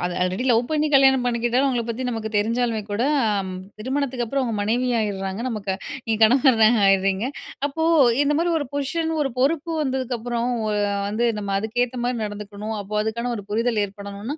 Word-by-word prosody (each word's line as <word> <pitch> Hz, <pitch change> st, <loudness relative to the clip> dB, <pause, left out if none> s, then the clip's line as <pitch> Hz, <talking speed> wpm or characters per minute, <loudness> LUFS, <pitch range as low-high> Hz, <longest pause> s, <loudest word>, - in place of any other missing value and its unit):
அது 175 Hz, 0 st, -2 dB
already 185 Hz, +6 st, -1 dB
love 230 Hz, 0 st, +4 dB
பண்ணி 305 Hz, -1 st, +1 dB
கல்யாணம் 265 Hz, -2 st, +5 dB
பண்ணிக்கிட்டாலும், 240 Hz, +2 st, +1 dB
அவுங்கள 240 Hz, -3 st, -1 dB
பத்தி 235 Hz, +3 st, -4 dB
நமக்கு 225 Hz, -2 st, -3 dB
தெரிஞ்சாலுமே 230 Hz, +1 st, 0 dB
கூட, 205 Hz, +3 st, 0 dB, 0.4 s
அம் 190 Hz, -1 st, -5 dB, 0.3 s
திருமணத்துக்கு 260 Hz, 0 st, -1 dB
அப்பறம் 275 Hz, +4 st, -1 dB
அவுங்க 230 Hz, -3 st, -2 dB
மனைவி 240 Hz, +4 st, 0 dB
ஆயிர்றாங்க 195 Hz, 0 st, -3 dB
நமக்கு 205 Hz, -4 st, -3 dB, 0.3 s
நீங்க 220 Hz, -1 st, 0 dB
கணவரா 235 Hz, -2 st, +5 dB, 0.2 s
ஆயிர்றீங்க 195 Hz, +2 st, +2 dB, 0.4 s
அப்போ 290 Hz, +3 st, -4 dB, 0.4 s
இந்த 290 Hz, +1 st, +2 dB
மாரி 340 Hz, +1 st, +1 dB
1 290 Hz, -, -3 dB
பொசிஷன் 320 Hz, +4 st, -1 dB
1 270 Hz, -, -1 dB
பொறுப்பு 315 Hz, +4 st, +1 dB
வந்ததுக்கு 260 Hz, -3 st, -2 dB
அப்புறம் 235 Hz, +1 st, -2 dB, 0.2 s
ஒ -, -, 0 dB, 0.4 s
வந்து 220 Hz, +4 st, 0 dB
நம்ம 200 Hz, -1 st, -3 dB
அதுக்கேத்த 245 Hz, +4 st, -1 dB
மாரி 245 Hz, 0 st, 0 dB
நடந்துக்கணும். 210 Hz, +1 st, -6 dB
அப்போ 205 Hz, +1 st, -7 dB
அதுக்கான 235 Hz, +3 st, -2 dB
1 205 Hz, -, -7 dB
புரிதல் 225 Hz, 0 st, +1 dB
ஏற்படணுன்னா 200 Hz, +6 st, -7 dB
235 Hz, 170 wpm, -23 LUFS, 210-260 Hz, 0.4 s, கல்யாணம்